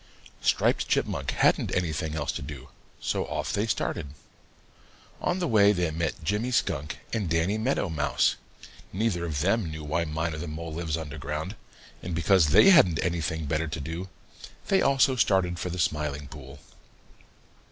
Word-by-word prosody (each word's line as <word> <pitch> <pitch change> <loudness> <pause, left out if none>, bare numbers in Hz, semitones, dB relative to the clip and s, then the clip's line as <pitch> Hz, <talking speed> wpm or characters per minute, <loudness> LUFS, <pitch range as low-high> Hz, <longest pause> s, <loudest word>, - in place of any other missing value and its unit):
Striped - - +2
Chipmunk - - 0
hadn't - - +2
anything 80 -3 -1
else 75 -2 -1
to - - -5
do, 70 -2 -8 0.3
so - - -1
off - - -3
they 105 +3 0
started. 90 - -2 1.1
On 180 - 0
the 180 -2 -1
way 105 -4 +5
they 90 -5 0
met 80 0 -3
Jimmy 105 +9 0
Skunk 85 - -1 0.2
and 105 -7 -1
Danny 85 +6 +1
Meadow 115 -3 0
Mouse. 75 -3 +1 0.6
Neither 95 -4 -1
of 75 -4 -2
them 100 +1 +1
knew 80 0 -7
why 80 +3 -1
Miner 80 0 -3
the 85 - -5
Mole 80 +1 -6
lives 80 -1 -2
under 80 -1 -6
ground, 75 +8 -4 0.5
and 90 -2 -4
because 85 -1 +4
they 135 - +7
hadn't 90 - +6
anything 80 -2 -2
better 80 +2 -1
to 80 +1 -5
do, 80 +6 -5 0.6
they 195 - +4
also 135 -1 +3
started 95 -6 +2
for 90 - -3
the 90 - -4
Smiling 75 -3 -1
Pool. 70 -1 -11
85 Hz, 165 wpm, -27 LUFS, 75-95 Hz, 1.1 s, they